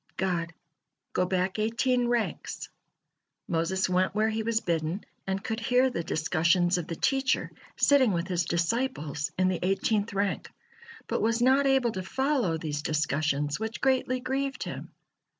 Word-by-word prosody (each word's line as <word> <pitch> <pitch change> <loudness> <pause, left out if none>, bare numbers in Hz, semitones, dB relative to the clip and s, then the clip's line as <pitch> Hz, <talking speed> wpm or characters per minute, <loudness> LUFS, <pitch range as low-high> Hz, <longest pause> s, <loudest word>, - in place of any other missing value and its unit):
God: 175 -3 -1 0.6
"Go 180 - +1
back 185 +2 0
eighteen 240 +3 +1
ranks." 240 -2 -2 0.8
Moses 170 +3 0
went 185 +1 +1
where 215 +1 +2
he 220 0 -1
was 225 0 +1
bidden, 170 0 -2 0.2
and 190 +1 -2
could 220 0 -2
hear 250 +3 +3
the 170 - -3
discussions 170 +2 +2
of 170 - -5
the 165 - -4
teacher 270 - +1 0.2
sitting 270 -5 +4
with 170 -1 -1
his 180 -2 0
disciples 170 - -1
in 185 0 +3
the 185 -2 0
eighteenth 205 +3 +1
rank, 200 -1 -1 0.6
but - - -1
was 230 +1 +2
not 265 +3 +4
able 265 -3 +3
to 190 - -4
follow 255 - 0
these 150 -2 -3
discussions, 150 -1 0
which 220 +1 -4
greatly 260 -1 +1
grieved 270 +1 -2
him. - - -6
195 Hz, 150 wpm, -28 LUFS, 170-245 Hz, 0.8 s, sitting